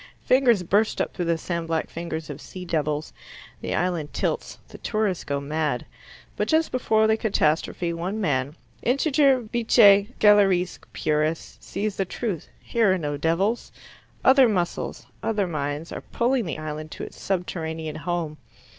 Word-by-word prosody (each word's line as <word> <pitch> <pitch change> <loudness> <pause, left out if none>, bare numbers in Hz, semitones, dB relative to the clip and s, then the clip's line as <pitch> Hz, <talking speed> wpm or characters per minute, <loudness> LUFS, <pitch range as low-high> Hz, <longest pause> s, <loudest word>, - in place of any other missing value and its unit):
Fingers 245 -7 +4
burst 205 +5 +2
up - - -1
through 175 - -2
the 170 0 +1
sand 170 0 -3
black 165 -1 -1
fingers 160 -2 -5
of 145 +1 -8
sea 185 -1 -8
devils. 150 -2 -1 0.5
The - - -2
island 175 -4 -1
tilts. - - -2
The - - -12
tourists 215 -5 -1
go 140 0 -2
mad. 150 -2 -2 0.5
But - - -1
just 320 0 +2
before 220 -4 +2
the 220 0 +3
catastrophe 170 -4 0
one 180 +6 -3
man, 145 -6 0 0.3
integer 275 0 +3
vitae 215 -3 +5
scelerisque 195 -4 +4
purus, 155 +1 -1
sees 210 -1 -3
the 195 - +1
truth. 190 -3 -4
Here 225 -4 +2
are 190 - +2
no 145 -4 -2
devils. 170 +10 0 0.5
Other 265 -2 +7
muscles, 175 -5 -2 0.2
other 210 -3 0
minds, 150 -1 -3
are - - -5
pulling 245 -1 0
the 160 - -4
island 155 0 -5
to - - -7
its - - -9
subterranean 160 -4 -3
home. 165 -2 -3
180 Hz, 155 wpm, -25 LUFS, 155-215 Hz, 0.5 s, Other